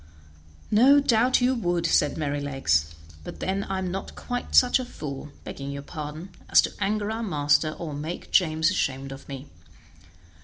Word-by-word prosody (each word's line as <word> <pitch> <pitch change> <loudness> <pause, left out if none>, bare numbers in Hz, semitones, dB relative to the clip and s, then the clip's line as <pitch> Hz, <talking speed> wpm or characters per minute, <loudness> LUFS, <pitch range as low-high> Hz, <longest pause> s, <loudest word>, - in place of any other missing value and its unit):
"No 260 +7 +6
doubt 250 -1 +3
you 250 +1 +3
would," 175 -8 -1
said 150 -3 +2
Merrylegs; 140 - 0 0.3
"but - - -9
then 195 +1 -1
I 195 - -3
am 185 -1 -2
not 195 +1 -6
quite 245 0 -4
such 250 +1 +6
a - - -2
fool 150 - -7
(begging 140 0 -7
your 140 0 -6
pardon) 155 +3 -7 0.2
as - - +6
to - - -3
anger 205 +1 -1
our 225 +1 -3
master 155 -5 +1
or 160 -2 -6
make 155 +4 -6
James 160 -1 +3
ashamed 135 -7 -2
of 135 +1 -10
me. 135 0 -7
165 Hz, 165 wpm, -25 LUFS, 145-210 Hz, 0.3 s, No